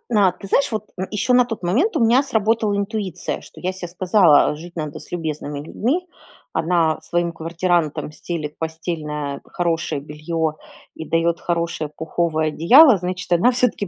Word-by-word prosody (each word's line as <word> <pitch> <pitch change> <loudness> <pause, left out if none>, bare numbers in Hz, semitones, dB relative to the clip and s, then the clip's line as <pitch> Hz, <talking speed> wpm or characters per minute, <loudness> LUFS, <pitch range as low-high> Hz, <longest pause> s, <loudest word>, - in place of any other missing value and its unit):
а, 195 -3 +5
ты 195 - -11
знаешь, 275 - +2
вот 215 -1 -3 0.3
еще 210 +4 +1
на 250 0 +6
тот 225 -4 -6
момент 260 - +1
у - - 0
меня 250 +5 +4
сработала 220 -3 +1
интуиция. 200 -3 -3
Что - - -14
я 185 +1 -2
се 185 -2 -7
сказала: 175 -4 +4
"Жить 170 +3 -11
надо 155 -2 -4
с - - -14
любезными 150 -4 -4
людьми". 260 - -2 0.5
Она 165 -2 +1
своим 170 0 -1
квартирантам 165 -2 -1
стелет 155 -2 -5
постельное 155 -3 -4
хорошее 170 -4 -2
белье 155 +2 -3 0.4
и 160 - -6
дает 165 +1 0
хорошее 170 -3 -2
пуховое 160 0 -1
одеяло, 240 - +7
значит, 180 +1 -5
она 175 +9 +4
всё-таки 245 -5 0
175 Hz, 155 wpm, -21 LUFS, 160-210 Hz, 0.5 s, одеяло